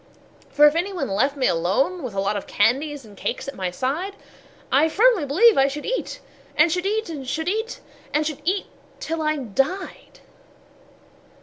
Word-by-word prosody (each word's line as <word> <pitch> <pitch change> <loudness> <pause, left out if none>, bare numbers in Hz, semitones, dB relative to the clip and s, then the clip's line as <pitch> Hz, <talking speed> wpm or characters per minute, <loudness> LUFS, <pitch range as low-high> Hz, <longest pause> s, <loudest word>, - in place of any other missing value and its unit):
For 295 - +5
if 295 - +6
any 350 +5 -1
one 370 - -3
left 270 +9 +1
me 260 - +1
alone 195 - +1
with 245 -7 -6
a - - -1
lot 200 +2 0
Of 205 - -5
candies 270 +6 +1
and 210 -2 -14
cakes 260 - -4
at 275 - -4
my 185 -5 -3
side, 295 - -3 0.6
I 295 +4 +4
firmly 420 -3 +3
believe 405 - +5
I 270 - +5
should 290 +2 -5
eat, - - -3 0.4
and 310 +2 +5
should 360 +3 0
eat, 440 +2 -1
And 285 -5 -6
should 320 +5 -2
eat, 440 +4 -2 0.3
and 305 +1 +1
should 300 -1 -4
eat, 380 +5 0 0.3
till 325 0 -3
I 305 0 +1
died. 270 - -3
295 Hz, 185 wpm, -23 LUFS, 265-360 Hz, 0.6 s, if